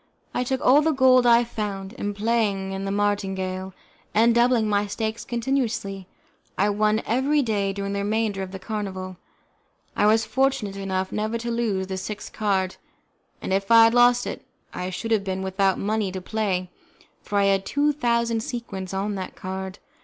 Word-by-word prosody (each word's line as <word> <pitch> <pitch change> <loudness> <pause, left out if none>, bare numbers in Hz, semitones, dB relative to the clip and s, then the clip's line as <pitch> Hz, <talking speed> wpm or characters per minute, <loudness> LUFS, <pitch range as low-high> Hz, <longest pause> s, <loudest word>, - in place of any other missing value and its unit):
I - - 0
took 260 +1 -2
all 275 +4 +7
the 315 +1 +2
gold 255 -2 +5
I 235 0 +6
found, 205 -4 -5
and 205 0 -3
playing 200 -3 0
the - - -2
martingale, 190 -2 -1 0.4
and 230 +2 +5
doubling 235 -1 +3
my 205 0 +1
stakes 220 +2 -3
continuously, 230 -6 -2 0.5
I 205 +2 +2
won 215 +1 +1
every 275 +5 +2
day 205 -4 0
during 200 0 -4
the 200 - -1
remainder 210 -1 -1
of 190 -1 -5
the 190 - -6
carnival. 190 -3 -5 0.8
I 210 - +3
was 220 +1 +4
fortunate 260 -3 0
enough 190 -1 -2
never 215 +2 -1
to 235 +1 -4
lose 220 -5 0
the 190 0 -4
sixth 205 +2 -6
card, 195 -3 0 0.7
and, - - -1
if 195 0 0
I 230 0 +8
had 225 0 +5
lost 245 0 +5
it, - - -5 0.3
I 180 - -3
should 225 +5 -5
have 215 -3 +3
been 190 -1 -3
without 190 0 +1
money 210 -1 -1
to 190 - -3
play, 185 -2 -2 0.5
for 205 - -3
I 200 - +4
had 195 -1 +2
two 290 +6 +1
thousand 235 -4 +1
sequins 195 -6 -5
on 200 +2 -1
that 190 -2 -6
card. 190 +1 -6
205 Hz, 175 wpm, -24 LUFS, 195-235 Hz, 0.8 s, I